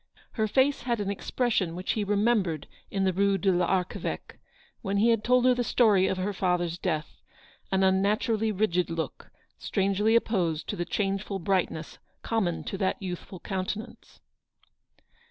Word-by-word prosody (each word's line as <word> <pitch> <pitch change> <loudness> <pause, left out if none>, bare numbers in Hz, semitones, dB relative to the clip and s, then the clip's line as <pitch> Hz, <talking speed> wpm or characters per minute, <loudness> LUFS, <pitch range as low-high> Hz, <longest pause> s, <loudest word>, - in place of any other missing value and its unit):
Her 220 -2 0
face 265 +6 +2
had 240 -2 -1
an 200 -1 -1
expression 200 -4 -1
which 180 +2 -2
he 215 - -1
remembered 205 -6 +1 0.2
in 195 -1 -1
the 190 -1 +2
Rue 200 +1 +2
de 195 +1 +2
VArcheveque, 180 +1 -1 0.4
when 195 +1 -1
he 220 +4 +4
had 225 -2 +2
told 250 0 +3
her 255 - +6
the 245 0 0
story 210 -6 +4
of 190 - -1
her 190 +2 -1
father's 175 -2 0
death 155 0 -3 0.2
— - - -29
an 190 0 +2
unnaturally 210 +4 +2
rigid 180 -4 +1
look, 165 -1 -5 0.3
strangely 200 +3 +1
opposed 175 -9 +1
to - - -1
the 175 - -2
changeful 195 +1 -2
brightness 175 -3 -1 0.2
common 195 -7 -1
to 195 - -5
that 190 - 0
youthful 185 0 -6
countenance. 200 +4 -5
195 Hz, 155 wpm, -28 LUFS, 180-215 Hz, 0.4 s, her